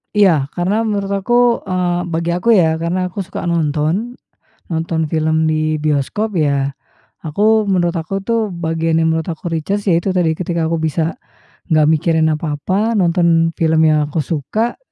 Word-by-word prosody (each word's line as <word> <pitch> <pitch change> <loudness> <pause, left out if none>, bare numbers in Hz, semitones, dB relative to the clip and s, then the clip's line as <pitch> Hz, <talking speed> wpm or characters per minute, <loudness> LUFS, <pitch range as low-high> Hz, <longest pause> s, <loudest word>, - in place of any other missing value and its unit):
Iya 175 -10 +4
karena 180 +4 0
menurut 200 -2 -2
aku, 240 +4 +2
eee, 180 -1 -1
bagi 170 0 -2
aku 180 +6 -1
ya 160 -4 +3
karena 170 +3 -1
aku 200 - -7
suka 190 - -6
nonton, 170 +7 -1 0.5
nonton 160 -1 -2
film 160 0 +1
di 155 0 0
bioskop 155 +8 -1
ya, 140 -4 0 0.5
aku 215 +8 +2
menurut 175 -2 +1
aku 170 +4 -3
itu 220 +1 -1
bagian 165 -1 -1
yang 160 - +2
menurut 160 -1 -3
aku 165 +1 -7
recharge 185 +5 -2
yaitu 175 +1 +2
tadi 175 -3 +1
ketika 170 -1 -2
aku 165 - 0
bisa 160 +1 -1 0.5
nggak 155 -3 +3
mikirin 160 0 +2
apa-apa, 175 +9 -1
nonton 170 -3 +2
film 160 -1 +2
yang 155 -1 +2
aku 150 0 -2
suka 195 - -2
165 Hz, 155 wpm, -17 LUFS, 160-190 Hz, 0.5 s, Iya